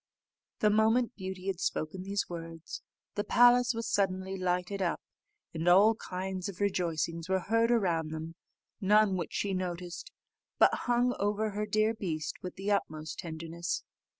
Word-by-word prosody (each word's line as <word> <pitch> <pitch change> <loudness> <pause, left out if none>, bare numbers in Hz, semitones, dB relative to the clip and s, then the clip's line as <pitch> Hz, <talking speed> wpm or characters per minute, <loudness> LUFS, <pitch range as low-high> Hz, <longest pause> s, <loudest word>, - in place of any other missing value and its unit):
The 210 - +5
moment 225 +3 +3
Beauty 190 -1 -6
had 195 -3 -2
spoken 170 +2 -2
these 200 +1 -2
words, 165 -1 -7 0.3
the 205 - -1
palace 245 +2 +5
was 230 0 -3
suddenly 190 -1 0
lighted 180 +1 -1
up, 175 -2 0 0.5
and 165 +1 -3
all 200 +5 +7
kinds 185 -2 -4
of 185 - -9
rejoicings 170 -3 -1
were 190 0 +2
heard 230 +4 +2
around 175 -9 +1
them, 160 +1 -6 0.5
none 210 -1 +4
which 175 -3 -4
she 200 -1 0
noticed, 180 -2 -4 0.5
but - - +6
hung 245 0 +1
over 210 +1 0
her 210 +1 -3
dear 215 +2 +2
beast 160 -8 -4
with 180 - -6
the 195 +2 -2
utmost 155 -6 -2
tenderness. 165 +1 -4
190 Hz, 150 wpm, -31 LUFS, 170-210 Hz, 0.5 s, all